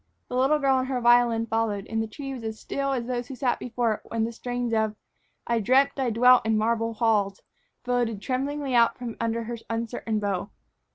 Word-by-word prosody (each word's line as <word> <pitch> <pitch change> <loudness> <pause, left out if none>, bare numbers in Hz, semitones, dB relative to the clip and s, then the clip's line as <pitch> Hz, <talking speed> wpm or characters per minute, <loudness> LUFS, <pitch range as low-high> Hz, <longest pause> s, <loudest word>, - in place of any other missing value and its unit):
The 250 - -4
little 270 +4 +3
girl 270 -2 +2
and 255 - -2
her 260 -2 -1
violin 240 -1 +4
followed, 220 -3 -1
and 225 0 -2
the 225 - -2
tree 270 +5 -7
was 250 -3 -7
as 220 -1 -5
still 275 0 -2
as 250 -3 -1
those 245 -1 -3
who 270 - -7
sat 250 0 0
before 240 -2 0
it - - -7
while 230 -1 -2
the 230 - -1
strains 245 0 -3
of 220 -1 +1 0.5
"I 235 -1 +1
Dreamt 260 +6 +4
I 260 -2 +1
Dwelt 250 +2 +5
in 220 -1 +1
Marble 230 +1 0
Halls" 210 -3 +1 0.4
floated 245 -4 0
tremblingly 275 +3 -2
out 235 -1 +4
from 240 -2 -6
under 230 0 -1
her 235 +1 -5
uncertain 230 -1 -2
bow. 200 -1 -2
235 Hz, 210 wpm, -26 LUFS, 225-250 Hz, 0.5 s, Dwelt